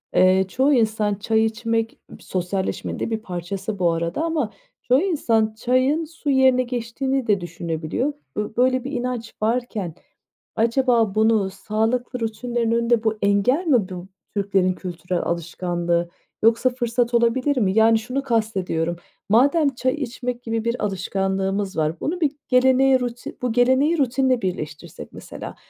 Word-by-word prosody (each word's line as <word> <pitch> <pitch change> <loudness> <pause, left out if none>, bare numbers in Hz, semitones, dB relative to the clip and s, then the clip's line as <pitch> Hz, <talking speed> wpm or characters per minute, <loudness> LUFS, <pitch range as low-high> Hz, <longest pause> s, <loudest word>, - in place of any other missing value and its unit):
Eee, 185 +1 +5
çoğu 265 +9 +2
insan 215 -3 +1
çay 220 +2 +1
içmek 225 0 -2 0.2
sosyalleşmenin 185 +1 -3
de - - -2
bir 220 - -1
parçası 190 +2 -5
bu 175 -2 +3
arada 170 - -2
ama 310 -9 -1 0.3
çoğu 255 +3 +3
insan 230 - +1
çayın 260 +7 +1
su 320 -1 -6
yerine 260 -2 +4
geçtiğini 250 +2 -2
de 200 -3 +2
düşünebiliyor. 170 - -3 0.2
B 210 +1 -3
böyle 255 0 +3
bir 270 - -5
inanç 245 -3 -3
varken 220 -6 -1 0.6
acaba 230 -2 +2
bunu 215 -3 +3
sağlıklı 225 +6 -2
rutinlerin 230 +1 -2
önünde 235 0 +2
bu 220 -1 0
engel 205 - +2
mi 235 -10 +3
bu 180 0 -7 0.3
Türklerin 195 -2 +1
kültürel 180 -1 -4
alışkanlığı 170 0 -1 0.3
yoksa 230 +3 +4
fırsat 240 -1 -1
olabilir 250 +4 +2
mi? 195 -6 +2
Yani, 225 0 +5
şunu 255 +5 -3
kastediyorum 195 -9 -1 0.3
madem 280 +5 +4
çay 255 +1 0
içmek 250 -3 -4
gibi 225 -1 -2
bir 235 0 -1
alışkanlığımız 195 0 -1
var, 160 +1 0
bunu 350 +4 -3
bir 295 -3 +3 0.2
geleneğe 260 +1 +4
ruti 245 -1 -5
bu 250 -1 0
geleneği 260 +7 +3
rutinle 260 -2 +2
birleştirsek 155 - -6
mesela - - -8
225 Hz, 140 wpm, -22 LUFS, 195-255 Hz, 0.6 s, Eee